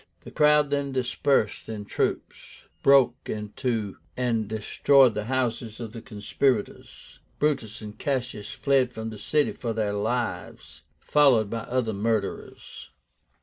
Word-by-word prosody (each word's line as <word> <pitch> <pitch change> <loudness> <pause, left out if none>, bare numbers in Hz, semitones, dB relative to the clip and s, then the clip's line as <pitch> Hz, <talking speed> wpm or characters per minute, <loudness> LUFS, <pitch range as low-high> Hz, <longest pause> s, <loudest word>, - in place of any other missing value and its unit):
The - - -11
crowd 150 -1 +4
then 140 -1 -1
dispersed 130 -3 0
in 105 -2 -5
troops, - - -2 0.5
broke 135 -3 +5
into 105 0 -3 0.2
and 115 -4 0
destroyed 120 +4 +3
the 105 0 -3
houses 120 -3 -2
of 115 -3 -6
the 115 - -8
conspirators. 105 +3 -3 0.2
Brutus 120 -8 -1
and 105 -1 -8
Cassius 125 -6 -3
fled 135 -3 +1
from 110 -1 -6
the 105 - -9
city 150 +5 +1
for 115 -2 -4
their 105 -2 -1
lives, 115 +4 -3 0.2
followed 130 -8 +3
by 115 -1 -4
the - - -15
other 125 -3 0
murderers. 105 0 -3
115 Hz, 135 wpm, -26 LUFS, 110-135 Hz, 0.5 s, broke